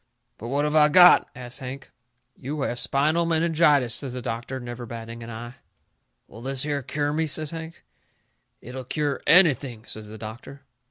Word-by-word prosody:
"But 115 - -7
what 140 +4 0
have 150 +1 -1
I 150 -1 +6
got?" 180 +3 +7
asts 125 -1 -5
Hank. 130 +1 -8 0.4
"You 145 +3 -5
have 120 -2 -2
spinal 155 +5 +2
meningitis," 160 -6 +2
says 130 +1 -5
the 125 - -5
doctor, 120 +4 -4
never 120 -1 -7
batting 115 0 -8
an 115 - -9
eye. 120 +2 -8 0.7
"Will 115 - -13
this 135 +1 0
here 145 -1 -2
cure 145 +3 -2
me?" 160 +1 0
says 155 0 -1
Hank. 165 0 -8 0.8
"It'll 130 +2 -8
cure 145 +2 -2
ANYTHING," 140 - +4
says 110 -1 -5
the 110 +1 -10
doctor. 115 +6 -10
135 Hz, 170 wpm, -24 LUFS, 120-150 Hz, 0.8 s, got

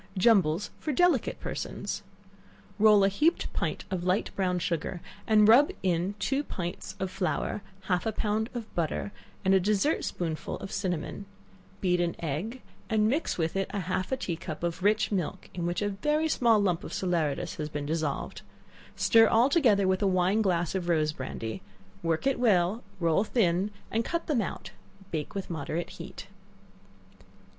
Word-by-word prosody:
Jumbles 190 -3 +3
for 305 - -2
Delicate 325 -3 +2
Persons. - - -4 0.8
Roll 210 -1 +6
a - - +6
heaped 300 - +1
pint - - -2
of 180 -2 -2
light 185 +3 0
brown 180 -2 +1
sugar, 170 +1 -2 0.3
and 215 -1 +6
rub 255 +7 +7
it - - -8
in 180 +2 0
two 270 +7 0
pints 175 -9 -5
or 190 - 0
flour, 185 +1 -2 0.2
half 185 +2 0
a - - +1
pound 220 +1 -1
of 230 -2 -6
butter, 170 +4 -2 0.3
and 190 - +5
a 190 - +6
dessert 210 - +1
spoonful 160 -3 -3
of 195 - -7
cinnamon; 190 0 -3 0.5
beat 180 -2 +2
an 170 -1 0
egg, 175 - -4 0.3
and 215 -2 +3
mix 295 +7 0
it 160 -2 0
with 195 0 -1
half 185 +1 -2
a 265 - +1
tea 180 -9 -3
cup 165 -2 -7
of 170 +1 -2
rich 215 +3 +2
milk 190 -1 -3
(in 175 -1 -2
which 175 +3 -1
a 205 - +1
very 300 +11 0
small 235 -7 +4
lump 180 -5 +1
of - - -7
salaeratus 170 -3 -1
has 150 0 -3
been 150 -1 -4
dissolved;) 155 -2 -2 0.5
stir 225 -1 +5
all 235 +5 +4
together 225 - +4
with 185 +1 +1
a 200 - +3
wine 185 +3 +2
glass 175 -4 +1
of 180 -2 -2
rose 155 -2 +2
brandy; 115 -5 -5 0.4
work 165 +3 0
it 270 -2 +2
well, 205 -1 +2 0.2
roll 170 +2 +3
thin 195 -4 +1 0.2
and 225 +1 +1
cut 335 +7 -2
them 280 -7 +1
out 190 - -5 0.4
bake 155 +1 -4
with 195 -2 -4
moderate 160 +2 -3
heat. 170 +2 -9
190 Hz, 170 wpm, -28 LUFS, 170-220 Hz, 0.8 s, rub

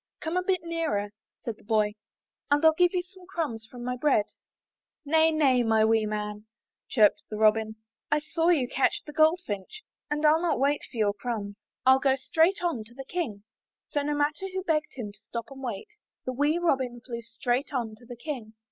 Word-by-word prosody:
''Come 320 +2 -3
a 365 - +3
bit 370 -2 0
nearer," 320 -12 -1 0.3
said 230 -3 -5
the - - -21
boy, 210 -1 +2 0.6
"and 290 0 +4
Til 320 0 +7
give 355 +1 +4
you 355 - +1
some 365 0 -17
crumbs 290 -12 -3
from 245 +1 -10
my 250 0 -2
bread." 250 -5 +3 0.8
"Nay, 320 +2 +4
nay, 280 -6 +3
my 220 -2 +3
wee 220 -1 +3
man," 210 0 -4 0.4
chirped 215 -5 +4
the 215 - -4
Robin. 220 0 +3 0.3
"I 295 - +3
saw 325 +3 0
you 290 -8 +3
catch 255 +2 +1
the 300 - -9
goldfinch, 315 - +1 0.3
and 295 +1 -1
Fll 310 +2 +5
not 350 -6 +1
wait 280 +2 +2
for 240 - -10
your 210 -2 +2
crumbs. 205 -2 -5 0.2
Fll 265 +1 +6
go 265 -1 +4
straight 330 +8 +2
on 325 -11 0
to 235 +2 -14
the 270 0 -8
King." 255 - -3 0.5
So, 290 - 0
no 295 +1 -1
matter 295 +6 0
who 375 0 -3
begged 310 -4 0
him 225 -6 -5
to 205 - -16
stop 230 +3 -7
and 270 0 -10
wait, 245 - -5 0.4
the 255 - -2
wee 290 +5 +2
Robin 265 -8 0
flew 235 -1 -6
straight 240 +3 -2
on 235 -5 -2
to 240 - -15
the 245 -1 -8
King. 240 -5 -6
265 Hz, 200 wpm, -28 LUFS, 220-320 Hz, 0.8 s, Til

